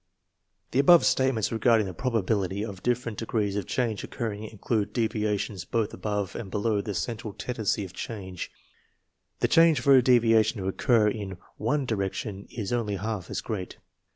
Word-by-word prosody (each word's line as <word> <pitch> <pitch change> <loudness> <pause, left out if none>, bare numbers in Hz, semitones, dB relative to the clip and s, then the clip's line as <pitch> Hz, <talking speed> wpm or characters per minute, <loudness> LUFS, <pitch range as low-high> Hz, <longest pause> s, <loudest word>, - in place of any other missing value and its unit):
The 130 - +1
above 170 +4 +7
statements 130 -5 +2
regarding 115 -1 +3
the 95 - -5
probability 100 -2 -1
of 100 -4 -8
different 120 -2 -1
degrees 110 -3 -1
of 100 -3 -3
change 115 -5 -1
occurring 110 -3 -4
include 110 0 -2
devia 110 -3 +1
tions 95 -3 -4
both 110 +4 -1
above 105 -3 -3
and 100 - -5
below 105 +1 0
the 100 -1 -5
central 105 +5 -3
tendency 110 -4 -2
of 90 - -11
change. 95 -5 -6 0.9
The 120 - +4
chance 165 +4 +5
for 135 +2 +5
a 130 - +7
deviation 115 -3 +4
to 95 - -3
occur 110 +3 +3
in 100 -3 -3 0.2
one 135 +6 0
di 120 - -1
rection 100 0 -4
isonly 105 -2 -2
half 105 -4 -4
as - - -3
great. 100 -5 -5
110 Hz, 165 wpm, -27 LUFS, 100-120 Hz, 0.9 s, above